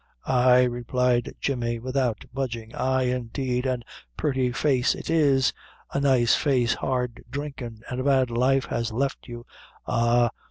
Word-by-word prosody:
"Ay," 125 0 +5
replied 120 0 0
Jemmy, 120 -4 -1
without 130 -1 -1
budging, 120 -4 -4
"ay, 130 0 +1
indeed 125 +1 -2
an' 125 -2 -1
a - - -36 0.3
purty 130 -3 0
face 130 -1 +1
it - - -5
is 140 -5 +3 0.4
a - - +1
nice 130 -4 +3
face 125 -6 +2
hard 125 -2 -2
drinkin' 130 -5 -6
an' 125 - -4
a - - -1
bad 130 -3 +2
life 130 +3 +2
has 115 0 -2
left 135 +4 -2
you. 120 -1 -8 0.4
Ah! 120 0 +2
125 Hz, 150 wpm, -25 LUFS, 120-135 Hz, 0.4 s, Ay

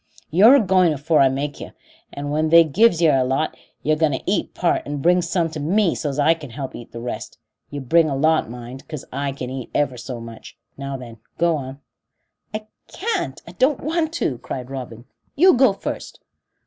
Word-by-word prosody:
You're 210 - +7
agoing 185 - +4
afore 150 +2 +1
I 135 -1 +6
makes 140 +2 -4
yer, - - -8 0.4
and 145 0 -5
when 155 +1 +1
they've 165 -1 +6
give 215 -3 +4
yer 160 -4 +4
a - - +3
lot, 135 +5 -1 0.3
you're 155 +1 +2
going 155 -2 +1
to 130 - -4
eat 195 -1 -1
part 175 - +1
and 145 0 -3
bring 180 +4 +3
some 170 0 0
to 155 - -5
me 180 +5 +2
so's 145 -3 -3
I 150 +3 +4
can 155 -4 -10
help 130 +3 -6
eat 120 - -10
the 115 - -7
rest. 120 +1 -6 0.3
You 145 -1 -6
bring 160 +5 +3
a 135 - -1
lot, 155 -1 +2
mind, 125 +2 -9
'cause 150 -4 -7
I 140 +1 -2
can 130 -2 -6
eat 130 -2 -6
ever 145 -4 +1
so 120 +1 -6
much. 115 -1 -11 0.2
Now 140 0 -5
then, 120 -3 -11 0.2
go 170 -1 +2
on." 135 -1 -7 0.7
"I 215 0 -5 0.2
can't 385 - -3
I - - -8
don't 260 +10 +1
want 320 +1 -1
to," 135 - -1
cried 125 +1 -6
Robin. 120 -3 -7 0.3
"You 365 +5 +6
go 260 -2 +5
first." 195 - -6
150 Hz, 205 wpm, -21 LUFS, 135-175 Hz, 0.7 s, You're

